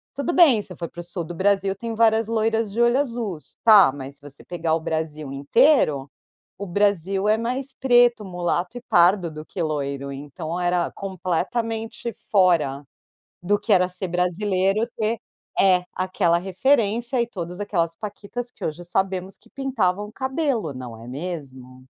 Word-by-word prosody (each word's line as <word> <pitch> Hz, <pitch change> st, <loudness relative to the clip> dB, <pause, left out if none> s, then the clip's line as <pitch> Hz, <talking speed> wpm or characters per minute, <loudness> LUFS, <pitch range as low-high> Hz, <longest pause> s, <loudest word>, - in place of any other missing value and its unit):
Tudo 280 Hz, +5 st, -1 dB
bem, 295 Hz, -12 st, +6 dB
se -, -, -14 dB
você 180 Hz, -, -8 dB
for 170 Hz, -, -4 dB
pro 175 Hz, -, -8 dB
sul 175 Hz, 0 st, -4 dB
do 175 Hz, -, -7 dB
Brasil, 195 Hz, +1 st, +1 dB
tem 230 Hz, +3 st, -5 dB
várias 225 Hz, -1 st, +3 dB
loiras 225 Hz, -1 st, 0 dB
de 220 Hz, -, -4 dB
olho 240 Hz, +2 st, +4 dB
azuis, 230 Hz, -, -4 dB
tá 210 Hz, -10 st, +8 dB
mas 140 Hz, 0 st, -8 dB
se -, -, -28 dB
você 145 Hz, 0 st, -13 dB
pegar 165 Hz, -2 st, -1 dB
o -, -, -1 dB
Brasil 155 Hz, -3 st, -4 dB
inteiro, 145 Hz, -, +3 dB, 0.5 s
o 200 Hz, -, -6 dB
Brasil 195 Hz, 0 st, +1 dB
é 215 Hz, -, +5 dB
mais 255 Hz, +4 st, -3 dB
preto, 245 Hz, -3 st, +4 dB
mulato 180 Hz, +3 st, -2 dB
e -, -, -7 dB
pardo 180 Hz, -3 st, +4 dB
do 155 Hz, 0 st, -8 dB
que 185 Hz, -, -9 dB
loiro. 140 Hz, -3 st, -3 dB
Então 145 Hz, +5 st, -6 dB
era 175 Hz, -1 st, +1 dB
completamente 220 Hz, +5 st, -3 dB, 0.2 s
fora 170 Hz, -8 st, +3 dB, 0.6 s
do 205 Hz, +3 st, +2 dB
que 210 Hz, +1 st, +2 dB
era 180 Hz, -1 st, +4 dB
ser 180 Hz, +1 st, -4 dB
brasileiro, 190 Hz, +4 st, 0 dB
ter 220 Hz, 0 st, 0 dB, 0.4 s
É, 180 Hz, -2 st, +4 dB
aquela 185 Hz, -2 st, +1 dB
referência 230 Hz, +5 st, +1 dB
e 235 Hz, -, -1 dB
todas 180 Hz, -3 st, -6 dB
aquelas 170 Hz, -5 st, -1 dB
paquitas, 210 Hz, +5 st, -6 dB
que -, -, -7 dB
hoje 160 Hz, +3 st, -4 dB
sabemos 190 Hz, +1 st, -2 dB
que -, -, -23 dB
pintavam 210 Hz, -7 st, -1 dB
cabelo, 265 Hz, -, -1 dB
não 125 Hz, -3 st, -8 dB
é 115 Hz, -, -11 dB
mesmo? 130 Hz, -4 st, -7 dB
190 Hz, 165 wpm, -23 LUFS, 165-225 Hz, 0.6 s, tá